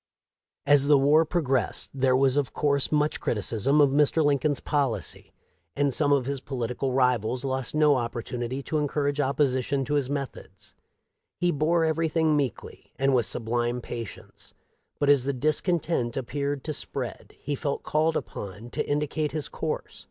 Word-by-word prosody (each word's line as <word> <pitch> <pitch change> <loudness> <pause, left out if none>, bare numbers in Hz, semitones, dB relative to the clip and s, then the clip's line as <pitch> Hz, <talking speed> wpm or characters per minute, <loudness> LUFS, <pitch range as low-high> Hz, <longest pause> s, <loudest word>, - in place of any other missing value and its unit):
As 145 -1 +5
the 145 -1 +6
war 150 +4 +4
progressed, 135 -7 0
there 130 -1 +2
was 135 0 +3
of 145 -3 0
course 140 -2 +1
much 150 0 +1
criticism 115 +6 +1
of 145 -2 +5
Mr. 150 +2 +3
Lincoln's 145 -1 +1
policy, 130 - -2 0.4
and 140 -1 +1
some 145 +1 +2
of 140 -3 +3
his 140 0 -3
polit 125 -3 -4
ical 130 -1 -2
rivals 125 -1 +1
lost 130 0 -3
no 150 -2 +4
opportunity 120 +2 -4
to 155 - -1
encourage 145 0 -1
opposi 135 -2 +1
tion 135 +1 -1
to 145 - -3
his 140 -3 0
methods. 140 -2 -6 0.7
He 175 0 +2
bore 160 +3 +2
everything 160 0 +1
meekly 135 -7 -4
and 135 0 +2
with 120 -4 +3
sublime 120 +1 0
patience, 115 -2 -9 0.4
but 145 - +1
as 140 -3 +5
the 140 +1 -1
discontent 155 -2 0
ap 130 - -2
peared 140 +1 -3
to 155 - -3
spread - - -6
he 145 - -4
felt 140 0 -3
called 155 +1 +1
upon 105 +5 -7
to 150 - -3
indicate 150 +1 -1
his 155 -2 -2
course. - - -4
140 Hz, 165 wpm, -26 LUFS, 125-150 Hz, 0.7 s, the